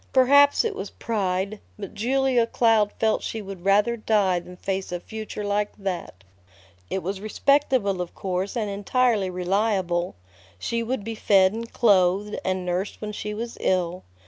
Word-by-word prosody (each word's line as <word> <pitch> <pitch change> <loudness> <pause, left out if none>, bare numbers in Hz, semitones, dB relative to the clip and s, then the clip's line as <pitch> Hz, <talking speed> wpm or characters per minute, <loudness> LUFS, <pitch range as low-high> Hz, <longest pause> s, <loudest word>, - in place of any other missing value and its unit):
Perhaps 285 - +5
it 445 - 0
was - - -5
pride, 200 -1 -2 0.2
but 200 -3 -7
Julia 255 +1 +1
Cloud 225 -3 +3
felt 220 -1 +1
she 225 - -4
would 195 -3 -8
rather 210 +4 +3
die 205 -5 +2
than 180 +1 -12
face 190 0 -3
a 175 - -2
future 215 +2 -7
like 205 0 -1
that. 180 - -5 0.7
It 190 - -2
was 190 +2 -4
respectable, 220 -3 +1
of 175 - -6
course, 190 +4 -3
and 215 -2 -1
entirely 205 0 +1
reliable. 180 -1 0 0.4
She 230 - -2
would 230 -1 -2
be 225 - -4
fed 195 -3 +4
and 230 +1 -6
clothed, 200 -1 +2
and 185 -1 -1
nursed 180 +3 -2
when 210 -1 -5
she 210 0 -5
was 230 +2 -6
ill. 180 -1 0
205 Hz, 160 wpm, -24 LUFS, 185-225 Hz, 0.7 s, Perhaps